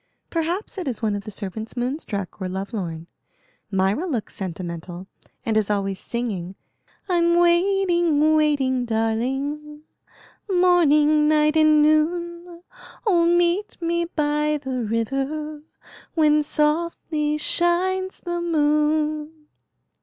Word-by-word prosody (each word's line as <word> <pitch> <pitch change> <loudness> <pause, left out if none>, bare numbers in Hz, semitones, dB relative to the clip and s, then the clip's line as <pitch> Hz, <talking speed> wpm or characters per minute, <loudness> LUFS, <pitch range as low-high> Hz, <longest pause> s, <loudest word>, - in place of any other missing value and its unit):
"Perhaps 345 +5 -2
it 360 - -5
is 235 -3 -4
one 210 -2 +1
of 200 - -6
the - - -6
servants 215 +3 -6
moon 255 +5 -1
struck 200 - -6
or 185 - -2
love 190 +4 -5
lorn. 165 -6 -4 0.6
Myra 195 - 0
looks 245 - -3
sentimental, 175 -1 -6 0.4
and 225 - 0
is 215 -2 +1
always 195 -2 -1
singing: 200 -7 -4 0.5
"I'm 340 -2 +2
waiting, 345 -3 +3
waiting, 270 -5 +1
darling, 270 +7 -2 0.7
Morning, 310 -5 +4
night, 305 0 +3
and 310 -1 +5
noon; 340 +3 0 0.4
Oh, 345 -5 +3
meet 345 +4 +1
me 340 0 0
by 300 -2 0
the 265 -3 -4
river 275 +7 -2 0.5
When 305 -2 +4
softly 300 0 0
shines 370 +4 0
the 345 -1 -3
moon." 305 -1 0
300 Hz, 115 wpm, -23 LUFS, 230-340 Hz, 0.7 s, and